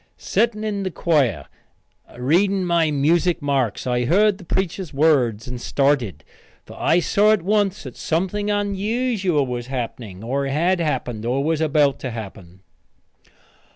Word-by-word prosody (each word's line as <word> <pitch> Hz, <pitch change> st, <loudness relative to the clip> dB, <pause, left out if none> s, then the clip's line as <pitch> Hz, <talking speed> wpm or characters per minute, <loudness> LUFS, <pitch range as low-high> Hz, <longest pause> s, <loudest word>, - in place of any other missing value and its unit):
Setting 225 Hz, -2 st, 0 dB
in 210 Hz, -2 st, -2 dB
the 190 Hz, -, -2 dB
choir, 135 Hz, -, +1 dB, 0.7 s
reading 185 Hz, +9 st, +2 dB
my 170 Hz, -2 st, +2 dB
music 160 Hz, +5 st, +2 dB
marks, 135 Hz, -7 st, -1 dB
I 125 Hz, -1 st, 0 dB
heard 200 Hz, -, +3 dB
the -, -, -11 dB
preacher's 185 Hz, 0 st, -2 dB
words 135 Hz, -6 st, +2 dB
and 125 Hz, -1 st, -6 dB
started, 130 Hz, -, 0 dB, 0.4 s
for -, -, -12 dB
I 170 Hz, -, +3 dB
saw 205 Hz, +5 st, +3 dB
at 200 Hz, -6 st, -1 dB
once 205 Hz, 0 st, +1 dB
that 130 Hz, -4 st, -9 dB
something 190 Hz, +5 st, -1 dB
unusual 205 Hz, -, 0 dB
was 120 Hz, -1 st, -5 dB
happening, 115 Hz, -6 st, -6 dB
or 135 Hz, +4 st, -1 dB
had 170 Hz, +7 st, +1 dB
happened, 125 Hz, -8 st, -2 dB
or 125 Hz, +4 st, 0 dB
was 160 Hz, +1 st, 0 dB
about 150 Hz, -3 st, +2 dB
to 130 Hz, -, -4 dB
happen. 95 Hz, -5 st, -9 dB
155 Hz, 145 wpm, -21 LUFS, 125-190 Hz, 0.7 s, heard